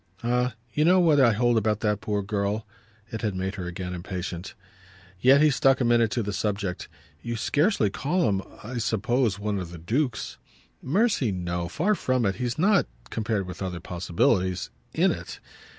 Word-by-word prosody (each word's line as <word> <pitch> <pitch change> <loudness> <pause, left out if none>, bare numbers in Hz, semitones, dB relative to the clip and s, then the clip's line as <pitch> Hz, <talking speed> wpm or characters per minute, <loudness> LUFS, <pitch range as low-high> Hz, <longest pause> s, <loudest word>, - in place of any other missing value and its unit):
"Ah 125 0 +1 0.2
you 150 - +2
know 180 +3 +5
what 160 -5 +4
I 125 -4 +6
hold 120 +2 +2
about 110 0 0
that 105 -2 0
poor 105 -1 -1
girl!" 105 +2 -1 0.5
It 110 - -4
had 105 -4 -1
made 95 +1 -2
her 95 -4 -5
again 90 0 -5
impatient. 90 0 -5 0.6
Yet 135 +5 +6
he 155 - +5
stuck 135 +1 +3
a 125 - +1
minute 120 -1 +4
to 120 +2 -1
the 105 0 -3
subject. 100 -3 -2 0.3
"You 120 0 -4
scarcely 145 - +1
call 165 - 0
him, 100 -2 +1 0.2
I 120 +3 -4
suppose, 115 0 +1
one 100 -1 -2
of 90 -3 -5
the 85 - -9
dukes." 115 - -2 0.4
"Mercy, 185 - +1
no 90 -2 -3
far 185 - +1
from 130 - 0
it. 95 -1 0
He's 125 +1 -2
not, 195 +6 +3 0.2
compared 110 -3 -1
with 90 +1 -8
other 90 -2 -3
possibilities, 90 +2 0 0.2
'in' - - +3
it. - - -6
110 Hz, 180 wpm, -26 LUFS, 95-125 Hz, 0.6 s, I